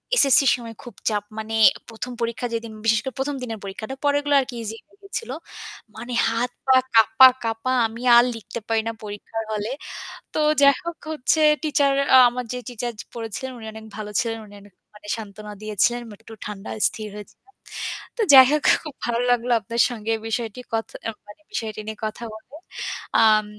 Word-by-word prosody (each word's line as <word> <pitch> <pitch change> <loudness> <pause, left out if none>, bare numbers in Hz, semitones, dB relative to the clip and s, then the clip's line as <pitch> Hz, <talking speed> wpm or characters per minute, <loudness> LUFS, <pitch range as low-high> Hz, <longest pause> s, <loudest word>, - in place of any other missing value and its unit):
এসএসসির 275 - +6
সময় 230 -2 -9
খুব 240 - -10 0.2
চাপ 210 -2 -1 0.2
মানে 220 +1 -5 0.4
১ম 230 +2 -6
পরীক্ষা 235 +1 -2
যেদিন 230 -1 -4
বিশেষ 220 -1 +4
করে 265 -3 -5
প্রথম 280 +2 -1
দিনের 225 -3 -5
পরীক্ষাটা 215 +6 -6
পরগুলো 290 0 +1
আরকি 260 -2 -3
easy 220 +1 -5
হয়ে 400 - -27
গিয়েছিল। 460 +4 -5 0.6
মানে 245 +1 -7 0.2
হাত 235 +2 -1 0.2
পা 265 - +6 0.2
কাঁপা-কাঁপা 225 +1 +5 0.2
আমি 225 +2 -10
আর 240 - +8
লিখতে 220 +1 -7
পারি 225 -1 +2
না - - 0
পরীক্ষার 210 +2 -5
হলে। 210 +1 -2 0.6
তো - - -1 0.2
যাই 280 -1 +7
হোক 340 0 -4 0.2
হচ্ছে 310 +2 +1 0.2
টিচার 285 -2 +2 0.4
আমার 250 +1 -5
যে - - -3
টিচার 240 0 -4 0.2
পড়েছিলেন 230 +3 -5
উনি 225 - -10
অনেক 220 0 -10
ভালো 210 -1 -6
ছিলেন। 230 -1 -3
উনি 205 - -16
অনেক 205 -1 -18 0.4
সান্ত্বনা 210 -1 -9
দিয়েছিলেন। 215 +3 +1 0.2
একটু 225 - -12
ঠান্ডা 205 -1 -7 0.2
স্থির 215 -1 -3
হয়েছিলাম। 210 -2 -12 0.7
তো - - 0
যাই 260 -1 +11
হোক 300 -1 +1 0.2
খুব 305 -4 -8
ভালো 235 0 0
লাগলো 245 0 +1
আপনার 230 +3 -1
সঙ্গে 225 -2 -3
বিষয়টি 225 0 -3
কথ 225 0 0 0.2
অ্যা 225 - -2 0.2
মানে 205 +9 -14
বিষয়টি 220 -2 -4
নিয়ে 220 - -5
কথা 215 +2 -5
বলে। 220 +6 -13 0.7
আম 215 -1 +5
230 Hz, 170 wpm, -23 LUFS, 220-255 Hz, 0.7 s, যাই